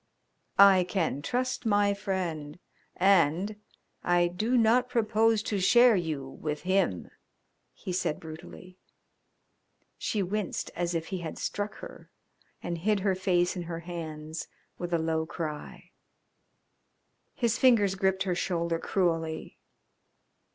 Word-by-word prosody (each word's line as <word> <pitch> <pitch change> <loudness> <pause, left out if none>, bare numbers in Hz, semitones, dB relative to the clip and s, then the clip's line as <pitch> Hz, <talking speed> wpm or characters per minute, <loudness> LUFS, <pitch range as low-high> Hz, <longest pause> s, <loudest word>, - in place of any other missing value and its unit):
"I 195 -2 +8
can 170 -6 -1
trust 255 - -2
my 205 -2 +3
friend, 180 -7 -3 0.4
and 190 +1 +3 0.5
I 175 0 +3
do 220 +8 0
not 240 +2 +3
propose 225 -2 +2
to 210 -4 -1
share 240 +5 +6
you 155 -7 -2
with 150 +2 -5
him," 185 - 0 0.6
he 185 - -7
said 170 -4 -1
brutally. 175 +3 -11 1.2
She 205 -3 -1
winced 200 +1 -3
as 175 0 -1
if 165 0 -3
he 190 - -3
had 165 -2 -6
struck 205 0 -3
her, - - -11 0.5
and 170 -1 -3
hid 205 +3 +1
her 195 -1 +2
face 180 -1 +1
in 180 - -3
her 165 -1 -4
hands 160 -2 -6 0.3
with 175 0 -4
a 170 - +3
low 160 0 -1
cry. 155 -4 -6 1.4
His 235 -1 0
fingers 225 -7 +5
gripped 190 0 +1
her 185 -2 -1
shoulder 170 -2 -1
cruelly. 165 -4 -1
185 Hz, 125 wpm, -28 LUFS, 165-205 Hz, 1.4 s, I